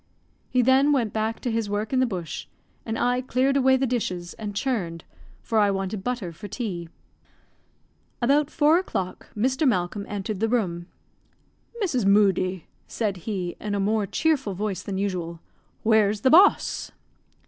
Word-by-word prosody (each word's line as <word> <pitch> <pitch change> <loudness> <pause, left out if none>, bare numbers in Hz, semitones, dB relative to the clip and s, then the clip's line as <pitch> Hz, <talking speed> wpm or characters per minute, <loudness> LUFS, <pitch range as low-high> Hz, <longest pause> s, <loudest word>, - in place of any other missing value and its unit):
He 250 -1 +2
then 265 +4 +4
went 240 -7 +1
back 220 +1 -1
to 245 - -2
his 225 -2 -1
work 210 +4 -2
in 260 - +3
the 255 - +3
bush, 180 -7 -5 0.4
and 225 0 -2
I 245 +1 +1
cleared 260 +2 +1
away 265 -1 +4
the 265 - +1
dishes, 185 -8 -2
and 205 -2 -6
churned, 190 -10 -2 0.4
for 225 - +1
I 205 -1 +4
wanted 195 0 -2
butter 240 -8 -3
for 205 +6 -9
tea. 190 -6 -5 1.3
About 280 +4 +3
four 310 +3 +4
o'clock 190 - -4
Mr. 260 +6 +1
Malcolm 200 -2 0
entered 205 0 -4
the 225 +1 +1
room. 175 -8 -1 1.0
"Mrs. 255 - 0
Moodie," 190 -3 +3 0.2
said 210 -4 -2
he, 185 -4 -3
in 210 -1 -2
a - - -1
more 210 +1 +1
cheerful 275 - 0
voice 200 0 -2
than 195 -2 -4
usual, 180 -4 -3 0.4
"where's 215 -2 +3
the 260 - +3
boss?" 370 +5 +4
215 Hz, 160 wpm, -25 LUFS, 195-255 Hz, 1.3 s, then